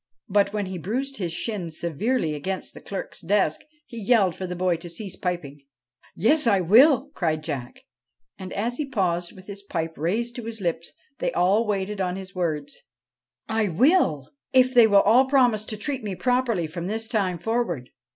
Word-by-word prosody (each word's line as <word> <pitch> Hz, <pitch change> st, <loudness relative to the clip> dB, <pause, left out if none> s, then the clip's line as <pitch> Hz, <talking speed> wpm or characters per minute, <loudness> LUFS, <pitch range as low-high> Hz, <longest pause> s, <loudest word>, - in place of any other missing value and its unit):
But, 200 Hz, 0 st, +2 dB
when 210 Hz, -1 st, -2 dB
he 185 Hz, -1 st, -5 dB
bruised 260 Hz, -, -3 dB
his 175 Hz, -4 st, -3 dB
shins 175 Hz, -3 st, -4 dB
severely 170 Hz, -, -1 dB
against 185 Hz, +6 st, -4 dB
the -, -, -11 dB
clerk's 195 Hz, -, -6 dB
desk, 190 Hz, -3 st, +1 dB, 0.2 s
he 235 Hz, -2 st, -8 dB
yelled 200 Hz, -4 st, +3 dB
for 185 Hz, -, -5 dB
the 180 Hz, -, -4 dB
boy 180 Hz, -1 st, +1 dB
to 170 Hz, +1 st, -8 dB
cease 190 Hz, +2 st, -6 dB
piping. 165 Hz, -7 st, -4 dB, 0.3 s
' -, -, -33 dB
Yes, 255 Hz, -, +3 dB
I 200 Hz, -4 st, +4 dB
will,' 260 Hz, -, +5 dB
cried 155 Hz, -3 st, -1 dB
Jack, 125 Hz, -5 st, -5 dB, 0.5 s
and 185 Hz, -1 st, -8 dB
as 235 Hz, +5 st, -2 dB
he 290 Hz, -2 st, -3 dB
paused 175 Hz, -7 st, 0 dB
with 185 Hz, -1 st, -14 dB
his 200 Hz, 0 st, -8 dB
pipe 165 Hz, -5 st, -3 dB
raised 225 Hz, -, -1 dB
to 240 Hz, -, -6 dB
his 225 Hz, -1 st, -5 dB
lips 170 Hz, -3 st, -2 dB, 0.3 s
they -, -, 0 dB
all 195 Hz, +6 st, +2 dB
waited 200 Hz, 0 st, -2 dB
on 180 Hz, -1 st, -1 dB
his 190 Hz, -1 st, -8 dB
words: 155 Hz, -5 st, -3 dB, 0.4 s
' 115 Hz, -, -56 dB, 0.2 s
I 220 Hz, -2 st, 0 dB
will, 185 Hz, -, +2 dB, 0.2 s
if 255 Hz, 0 st, +5 dB
they 240 Hz, -3 st, +7 dB
will 200 Hz, -2 st, +6 dB
all 240 Hz, +6 st, +5 dB
promise 245 Hz, -6 st, +3 dB
to 215 Hz, -, -6 dB
treat 265 Hz, +3 st, -3 dB
me 200 Hz, -3 st, -3 dB
properly 245 Hz, -6 st, +1 dB
from 170 Hz, +3 st, -5 dB
this 220 Hz, +2 st, -2 dB
time 200 Hz, -6 st, 0 dB
forward.' 175 Hz, -, -2 dB
195 Hz, 190 wpm, -25 LUFS, 175-230 Hz, 0.5 s, they